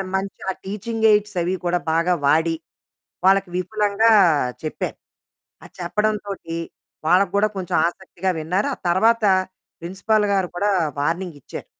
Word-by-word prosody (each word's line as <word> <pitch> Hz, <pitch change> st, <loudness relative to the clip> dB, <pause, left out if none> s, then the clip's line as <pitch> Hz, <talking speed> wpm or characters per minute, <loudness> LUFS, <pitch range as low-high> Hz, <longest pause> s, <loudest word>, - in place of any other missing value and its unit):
మంచి 195 Hz, +1 st, -3 dB
ఆ -, -, -5 dB
టీచింగ్ 220 Hz, +3 st, -3 dB
ఎయిడ్సవి 200 Hz, -4 st, +1 dB
కూడా, 175 Hz, 0 st, +1 dB
బాగా 170 Hz, +2 st, +2 dB
వాడి. 160 Hz, +3 st, +3 dB, 0.7 s
వాళ్ళకి 195 Hz, 0 st, +4 dB
విపులంగా 210 Hz, +4 st, +2 dB, 0.5 s
చెప్పాను. 155 Hz, -, -4 dB, 0.7 s
అది -, -, -15 dB
చెప్పడంతోటి 200 Hz, -1 st, -2 dB, 0.5 s
వాళ్ళకి 180 Hz, +3 st, +4 dB
కూడా 210 Hz, +1 st, +3 dB
కొంచెం 185 Hz, -2 st, -2 dB
ఆసక్తిగా 190 Hz, +1 st, -3 dB
విన్నారు. 180 Hz, -, -1 dB
ఆ -, -, -16 dB
తర్వాత, 225 Hz, +6 st, +3 dB, 0.6 s
ప్రిన్సిపల్ 200 Hz, +5 st, 0 dB
గారు 190 Hz, -2 st, +1 dB
కూడా 205 Hz, +3 st, +1 dB, 0.3 s
వార్నింగిచ్చారు, 165 Hz, -1 st, -4 dB
190 Hz, 115 wpm, -22 LUFS, 175-210 Hz, 0.7 s, వాళ్ళకి